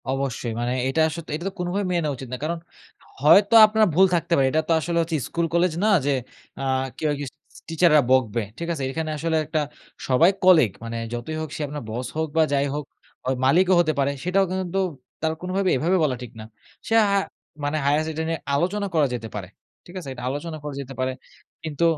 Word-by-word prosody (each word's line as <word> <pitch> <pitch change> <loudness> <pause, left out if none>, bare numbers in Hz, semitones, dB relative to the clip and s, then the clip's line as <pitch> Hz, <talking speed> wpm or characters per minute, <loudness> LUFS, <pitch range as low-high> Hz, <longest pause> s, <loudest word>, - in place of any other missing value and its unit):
অবশ্যই। 135 -3 -2
মানে 120 +1 -1
এটা 135 +4 +1
স - - -8 0.2
এটা 170 +4 -6
তো - - -13
কোনোভাবেই 180 +3 -1
মেনে 175 -1 +1
নেওয়া 145 -2 -1
উচিত 130 -1 -9
না। - - -2
কারণ 170 +2 -1 0.6
হয়তো 195 +9 +6
আপনার 215 0 +3
ভুল 190 +5 +6
থাকতে 170 0 -1
পারে। 135 -3 +3
এটা 155 - +2
তো - - 0
আসলে 170 +2 -2
হচ্ছে 165 0 -2
স্কুল 170 0 -1
কলেজ 170 0 +2
না - - +3 0.2
যে 145 - +2 0.5
আ - - -4 0.3
কেউ 155 - -1
আরকি 145 0 -3 0.3
স - - -12
টিচাররা 165 -2 +5
বকবে। 120 -3 +2 0.2
ঠিক 170 - -4
আছে? 140 -4 -4
এখানে 160 +2 -3
আসলে 160 +2 -1
একটা 155 +1 -1 0.5
সবাই 135 +7 +5
কলিগ। 165 - +6
মানে 115 0 -5 0.2
যতই 120 +7 -4
হোক 155 - -5
সে - - -5
আপনার 145 -1 -6
বস 120 +3 -4
হোক 160 0 0
বা 160 - +6
যাই 140 0 +2
হোক 150 -1 -4 0.4
অ - - +2 0.2
মালিকও 180 +7 +4
হতে 155 -2 +2
পারে 140 0 +2
সেটাও 185 +2 +2
কিন্তু 185 0 -2 0.4
তার 160 0 0
কোনোভাবে 185 +1 0
এভাবে 175 +8 +2
বলা 140 -4 +1
ঠিক 120 - -9
না। - - -7 0.4
সে - - -1 0.2
হা 200 - +3 0.5
মানে 145 +2 0
হাইয়েস্ট 150 +3 +2
এটা 160 +1 -3
নিয়ে 165 -1 -2 0.2
আলোচনা 200 +7 0
করা 155 -3 +3
যেতে 115 -2 -4
পারে। 100 -3 -5 0.4
ঠিক 175 - -13
আছে? 150 -7 -8
এটা 125 -1 -9
আলোচনা 155 +4 -4
করা 150 -1 -5
যেতে 135 0 -9
পারে, 130 0 0 0.5
কিন্তু 155 0 -3
155 Hz, 215 wpm, -23 LUFS, 135-175 Hz, 0.6 s, হয়তো